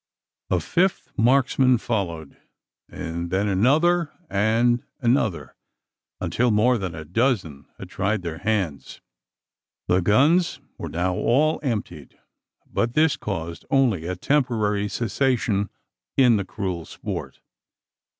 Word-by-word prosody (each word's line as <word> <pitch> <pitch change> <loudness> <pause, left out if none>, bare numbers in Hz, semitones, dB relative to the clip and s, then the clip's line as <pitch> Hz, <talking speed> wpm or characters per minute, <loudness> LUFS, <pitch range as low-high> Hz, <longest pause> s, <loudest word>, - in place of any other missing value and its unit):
A - - +2
fifth 185 +2 0
marksman 130 +1 +3
followed; 85 - -3 0.5
and 85 +1 -5
then 95 +3 0
another 150 - +3 0.2
and 115 +4 +2 0.2
another 115 - 0 0.6
until 125 +1 0
more 115 +3 +3
than 90 -4 -4
a 80 -1 -7
dozen 90 - -1
had - - -9
tried 100 0 -1
their 80 -2 -5
hands. 95 -8 -2 0.9
The 90 +1 +3
guns 145 - +3 0.2
were - - -5
now 90 +2 -1
all 145 - +2
emptied; 105 - -4 0.5
but 115 +1 -2
this 155 -2 +4
caused 85 -7 -5
only 120 -12 +2
a 90 - -2
temporary 105 -4 0
cessation 115 -3 0 0.5
in 125 -4 +5
the 100 - -2
cruel 90 -4 -4
sport. - - -6
110 Hz, 115 wpm, -23 LUFS, 90-130 Hz, 0.9 s, in